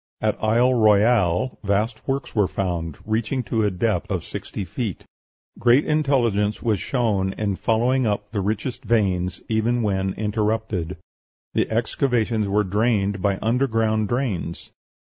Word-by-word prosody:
At -, -, -1 dB
Isle 120 Hz, +4 st, +3 dB
Royale 110 Hz, -1 st, +3 dB
vast 105 Hz, +3 st, -1 dB
works 135 Hz, 0 st, -2 dB
were 105 Hz, -4 st, +3 dB
found, 85 Hz, -5 st, -3 dB
reaching 115 Hz, +4 st, -1 dB
to 110 Hz, +1 st, 0 dB
a 105 Hz, -, +3 dB
depth 100 Hz, +1 st, -1 dB
of 95 Hz, -5 st, -2 dB
sixty 100 Hz, -, -6 dB
feet; 100 Hz, +2 st, -4 dB, 0.5 s
great 120 Hz, +5 st, +4 dB
intelligence 120 Hz, -9 st, +1 dB
was 110 Hz, -4 st, +1 dB
shown 105 Hz, -7 st, 0 dB
in 100 Hz, -2 st, -2 dB
following 120 Hz, +5 st, +1 dB
up 105 Hz, 0 st, -2 dB
the 105 Hz, -3 st, -1 dB
richest 110 Hz, +5 st, -3 dB
veins 95 Hz, -6 st, 0 dB
even 115 Hz, +2 st, +1 dB
when 95 Hz, -2 st, 0 dB
interrupted; 105 Hz, -4 st, -1 dB, 0.6 s
the -, -, +1 dB
excavations 115 Hz, -2 st, 0 dB
were 105 Hz, +2 st, +2 dB
drained 100 Hz, -1 st, 0 dB
by 100 Hz, 0 st, +1 dB
underground 110 Hz, -3 st, +1 dB
drains. 110 Hz, -10 st, -3 dB
110 Hz, 135 wpm, -23 LUFS, 100-120 Hz, 0.6 s, great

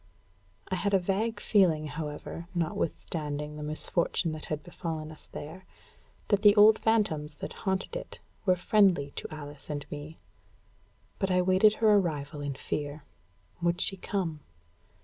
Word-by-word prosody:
I 185 Hz, -, 0 dB
had 200 Hz, +2 st, +1 dB
a -, -, +7 dB
vague 205 Hz, +4 st, -1 dB
feeling, 175 Hz, -9 st, +3 dB
however, 150 Hz, +2 st, -6 dB
notwithstanding 150 Hz, -3 st, -2 dB
the 150 Hz, -, -7 dB
misfortune 155 Hz, +2 st, -1 dB
that 155 Hz, -1 st, -6 dB
had 150 Hz, -1 st, -4 dB
befallen 160 Hz, -3 st, -5 dB
us 155 Hz, -, -12 dB
there, 160 Hz, +6 st, -8 dB, 0.7 s
that 205 Hz, -2 st, +3 dB
the 205 Hz, -1 st, +7 dB
old 215 Hz, +1 st, +7 dB
phantoms 160 Hz, -10 st, +1 dB
that -, -, -6 dB, 0.2 s
haunted 190 Hz, -, -1 dB
it -, -, -6 dB, 0.2 s
were 185 Hz, -3 st, +4 dB
friendly 180 Hz, -6 st, +3 dB
to -, -, -6 dB
Alice 145 Hz, -2 st, -9 dB
and 145 Hz, -2 st, -3 dB
me. 150 Hz, +2 st, -7 dB, 1.0 s
But 195 Hz, -, 0 dB
I 180 Hz, 0 st, +3 dB
waited 190 Hz, +4 st, +5 dB
her 220 Hz, -1 st, +4 dB
arrival 150 Hz, -7 st, 0 dB
in 145 Hz, -1 st, -3 dB
fear. 145 Hz, +2 st, -4 dB, 0.6 s
Would 170 Hz, 0 st, +1 dB
she 195 Hz, -, 0 dB
come? 180 Hz, -5 st, -2 dB
170 Hz, 150 wpm, -29 LUFS, 150-195 Hz, 1.0 s, a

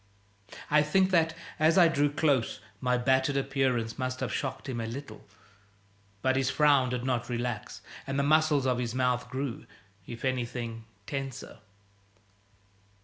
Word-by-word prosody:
I 150 Hz, 0 st, +6 dB
think 185 Hz, +6 st, +2 dB
that, 165 Hz, -2 st, +3 dB, 0.2 s
as 160 Hz, +3 st, +4 dB
I 175 Hz, -2 st, +8 dB
drew 145 Hz, -2 st, +2 dB
close, 145 Hz, -5 st, +1 dB, 0.2 s
my 125 Hz, -1 st, +1 dB
battered 130 Hz, +2 st, +2 dB
appearance 130 Hz, -4 st, 0 dB
must 130 Hz, 0 st, -2 dB
have -, -, -3 dB
shocked 135 Hz, +1 st, -3 dB
him 120 Hz, -3 st, -3 dB
a 115 Hz, -, -3 dB
little. 115 Hz, -2 st, -8 dB, 1.0 s
But 130 Hz, 0 st, +2 dB
his 135 Hz, -1 st, +1 dB
frown 145 Hz, -4 st, +4 dB
did 125 Hz, -1 st, -3 dB
not 125 Hz, -2 st, -1 dB
relax, 120 Hz, -3 st, -4 dB, 0.3 s
and 135 Hz, 0 st, -2 dB
the 140 Hz, -, +2 dB
muscles 155 Hz, -1 st, +3 dB
of 125 Hz, -1 st, +1 dB
his 120 Hz, -1 st, -3 dB
mouth 125 Hz, -1 st, 0 dB
grew, 130 Hz, -3 st, -4 dB, 0.4 s
if 120 Hz, +2 st, -6 dB
anything, 120 Hz, -3 st, -3 dB, 0.2 s
tenser. 135 Hz, -3 st, -6 dB
130 Hz, 145 wpm, -29 LUFS, 125-145 Hz, 1.0 s, I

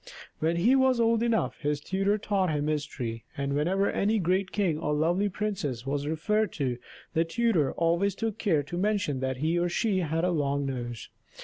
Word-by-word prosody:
When 165 Hz, +2 st, +1 dB
he 220 Hz, +10 st, +4 dB
was 260 Hz, -2 st, +3 dB
old 230 Hz, -1 st, +3 dB
enough 230 Hz, -2 st, 0 dB
his 150 Hz, -1 st, -1 dB
tutor 195 Hz, +6 st, 0 dB
taught 195 Hz, -3 st, 0 dB
him 150 Hz, -1 st, 0 dB
history; 140 Hz, -7 st, -3 dB
and 140 Hz, 0 st, -1 dB
whenever 185 Hz, +7 st, +1 dB
any 215 Hz, +3 st, +1 dB
great 185 Hz, +1 st, 0 dB
king 180 Hz, -7 st, 0 dB
or 150 Hz, -2 st, 0 dB
lovely 175 Hz, +7 st, +1 dB
princess 180 Hz, -, -3 dB
was 140 Hz, +1 st, -2 dB
referred 210 Hz, +8 st, 0 dB
to, 125 Hz, -5 st, -2 dB, 0.3 s
the 165 Hz, -, +3 dB
tutor 170 Hz, -, +1 dB
always 170 Hz, +4 st, +1 dB
took 225 Hz, -1 st, -3 dB
care 160 Hz, -9 st, +2 dB
to 175 Hz, +5 st, -6 dB
mention 200 Hz, -8 st, 0 dB
that 130 Hz, 0 st, -2 dB
he 160 Hz, +5 st, +1 dB
or 175 Hz, 0 st, +1 dB
she 195 Hz, +1 st, +1 dB
had 165 Hz, -1 st, -1 dB
a 180 Hz, -, +2 dB
long 140 Hz, -3 st, 0 dB
nose. 120 Hz, -4 st, -5 dB
170 Hz, 190 wpm, -28 LUFS, 145-205 Hz, 0.3 s, he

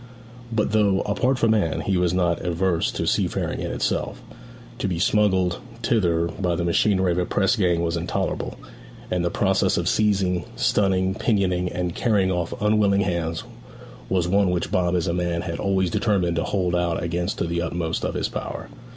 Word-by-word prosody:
But 105 Hz, -2 st, 0 dB
though, 105 Hz, -3 st, +3 dB
apart 125 Hz, +6 st, 0 dB
from 115 Hz, -3 st, +3 dB
Anne, 100 Hz, -7 st, 0 dB
he 95 Hz, -, 0 dB
was 90 Hz, -1 st, +2 dB
not 85 Hz, -1 st, +1 dB
averse 90 Hz, -1 st, 0 dB
to -, -, -2 dB
seafaring -, -, 0 dB
in -, -, -3 dB
itself, -, -, -2 dB, 0.6 s
to -, -, -1 dB
be 90 Hz, -3 st, -2 dB
smuggled 95 Hz, -2 st, +2 dB, 0.2 s
thither 85 Hz, -8 st, +2 dB
by 90 Hz, +1 st, -2 dB
the 85 Hz, -, -2 dB
machinery 95 Hz, +2 st, +2 dB
of 85 Hz, -, 0 dB
a 90 Hz, -, +1 dB
press 100 Hz, +4 st, +2 dB
gang 90 Hz, -6 st, +1 dB
was 85 Hz, 0 st, 0 dB
intolerable; 85 Hz, 0 st, -2 dB, 0.5 s
and 90 Hz, -1 st, 0 dB
the 85 Hz, -, +1 dB
process -, -, +1 dB
of -, -, -1 dB
seizing, 95 Hz, -5 st, +1 dB
stunning, 95 Hz, -2 st, +2 dB
pinioning, 95 Hz, -4 st, 0 dB
and 90 Hz, -1 st, -2 dB
carrying 100 Hz, -4 st, +1 dB
off 90 Hz, -2 st, -2 dB
unwilling 105 Hz, -1 st, +3 dB
hands 85 Hz, -4 st, -2 dB, 0.7 s
was 90 Hz, -2 st, +1 dB
one 100 Hz, +1 st, +3 dB
which 90 Hz, -1 st, -1 dB
Bob 90 Hz, -1 st, +1 dB
as 85 Hz, -, 0 dB
a 85 Hz, -, -1 dB
man 85 Hz, -1 st, -1 dB
had 85 Hz, -2 st, -4 dB
always 95 Hz, -3 st, +1 dB
determined 90 Hz, -6 st, +1 dB
to 85 Hz, -, 0 dB
hold 90 Hz, -3 st, 0 dB
out 85 Hz, -1 st, 0 dB
against 85 Hz, +1 st, -2 dB
to -, -, -1 dB
the 85 Hz, 0 st, -1 dB
utmost 85 Hz, -1 st, -2 dB
of -, -, -2 dB
his -, -, 0 dB
power. -, -, -6 dB
90 Hz, 185 wpm, -23 LUFS, 85-100 Hz, 0.7 s, though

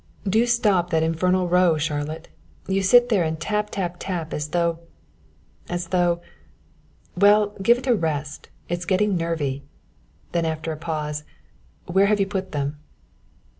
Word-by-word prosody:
"Do 220 Hz, +5 st, +3 dB
stop 210 Hz, -7 st, +2 dB
that 160 Hz, -1 st, +2 dB
infernal 180 Hz, +3 st, +1 dB
row, 180 Hz, -2 st, +3 dB
Charlotte; 150 Hz, +1 st, -3 dB, 0.4 s
you 195 Hz, +1 st, +1 dB
sit 245 Hz, +5 st, +5 dB
there 205 Hz, -7 st, +3 dB
and 160 Hz, 0 st, -2 dB
tap, 210 Hz, +4 st, -1 dB
tap, 180 Hz, -4 st, -3 dB
tap, 170 Hz, -4 st, -4 dB
as 150 Hz, 0 st, -3 dB
though 170 Hz, +1 st, 0 dB, 0.9 s
as 175 Hz, -1 st, -3 dB
though 175 Hz, -1 st, +1 dB, 0.9 s
well, 205 Hz, +2 st, +4 dB
give 235 Hz, +5 st, +5 dB
it 250 Hz, -, -8 dB
a 250 Hz, -, +4 dB
rest, 150 Hz, -, -3 dB, 0.2 s
it's 175 Hz, +1 st, -3 dB
getting 195 Hz, +2 st, +2 dB
nervy," 155 Hz, -5 st, -2 dB, 0.7 s
then 170 Hz, -1 st, 0 dB
after 160 Hz, 0 st, -2 dB
a -, -, -3 dB
pause, 150 Hz, -2 st, -4 dB, 0.6 s
"where 190 Hz, +3 st, +3 dB
have 210 Hz, 0 st, +2 dB
you 195 Hz, -, +3 dB
put 190 Hz, -1 st, -4 dB
them?" 145 Hz, 0 st, -3 dB
175 Hz, 150 wpm, -23 LUFS, 160-195 Hz, 0.9 s, sit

